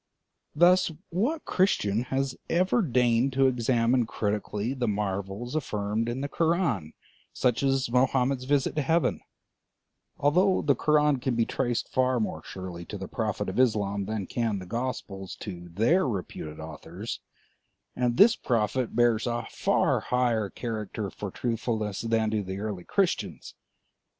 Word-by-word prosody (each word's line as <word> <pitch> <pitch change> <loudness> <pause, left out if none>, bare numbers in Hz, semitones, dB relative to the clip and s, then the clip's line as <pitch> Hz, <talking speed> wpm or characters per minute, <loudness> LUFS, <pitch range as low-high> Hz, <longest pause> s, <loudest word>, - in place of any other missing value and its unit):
Thus, 175 +4 +5 0.2
what 245 - 0
Christian 120 - +1
has 135 +1 -1
ever 185 +7 +3
deigned 125 - +2
to 135 +1 +3
examine 120 -1 +2
critically 105 +2 -2
the 125 -3 -2
marvels 100 +3 -2
affirmed 110 -5 -1
in 125 +3 -3
the 140 - -1
Koran, 160 - 0 0.4
such 125 -1 +1
as 135 -1 +2
Mohammed's 130 +1 +2
visit 140 +1 +1
to - - +3
heaven; 160 +4 +1 1.0
although 180 +7 +3
the 145 - +4
Koran 150 -1 +3
can 125 -1 -1
be 115 -1 +2
traced 120 -1 -1
far 130 -1 +1
more 110 - -2
surely 90 -2 -7
to 105 - -6
the 95 - -6
Prophet 110 -4 -2
of 95 - -2
Islam 100 -5 +2
than 105 -1 -3
can 115 -2 -1
the 95 - -7
Gospels 105 -4 -4
to 90 -1 -7
their 120 - +2
reputed 90 -7 -5
authors, 80 -1 -7 0.8
and 120 -1 0
this 215 +3 +7
Prophet 115 0 0
bears 120 -1 +3
a 120 0 -2
far - - +2
higher 120 -5 +1
character 110 -3 -4
for 105 - -6
truthfulness 110 -2 -2
than 115 -1 +1
do 110 -1 0
the 95 -1 -5
early 100 -4 -4
Christians? - - -1
120 Hz, 145 wpm, -27 LUFS, 105-135 Hz, 1.0 s, this